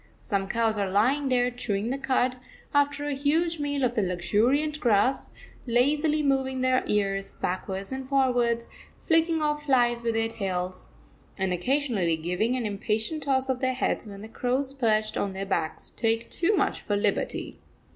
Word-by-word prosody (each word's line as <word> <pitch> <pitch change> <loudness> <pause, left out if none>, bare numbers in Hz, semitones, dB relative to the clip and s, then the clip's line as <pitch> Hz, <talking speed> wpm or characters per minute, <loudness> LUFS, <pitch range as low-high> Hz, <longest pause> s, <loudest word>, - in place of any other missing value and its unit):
Some 195 -3 -2
cows 225 0 +1
are 200 -1 0
lying 260 +9 +2
there 250 -1 +2
chewing 225 -2 -2
the 270 - -1
cud, 255 -1 +1 0.4
after 285 0 +2
a 290 - -1
huge 315 +4 +1
meal 285 -2 0
off 240 - 0
the 220 - +1
luxuriant 225 +12 +1
grass, 245 +1 +2 0.4
lazily 295 +6 +2
moving 265 -2 +1
their 255 0 +2
ears 195 -1 0
backwards 190 +3 -3
and 265 0 -5
forwards, 245 -4 +2 0.3
flicking 325 -1 +2
off 295 0 -1
flies 240 -3 +3
with 230 -1 -1
their 225 0 +1
tails, 185 -5 -4 0.5
and 190 -2 0
occasionally 205 - +1
giving 180 +9 -1
an 250 -3 -2
impatient 215 +8 -2
toss 265 -2 +1
of 260 -1 -1
their 260 -1 0
heads 255 - -1
when 200 0 -9
the - - -7
crows 255 +4 -1
perched 220 -5 +1
on 200 -1 -1
their 195 +1 -4
backs 170 -5 -2
take 225 0 -1
too 375 +5 +2
much - - 0
of - - -25
a 205 - +2
liberty. 205 0 -1
245 Hz, 170 wpm, -27 LUFS, 205-275 Hz, 0.5 s, flies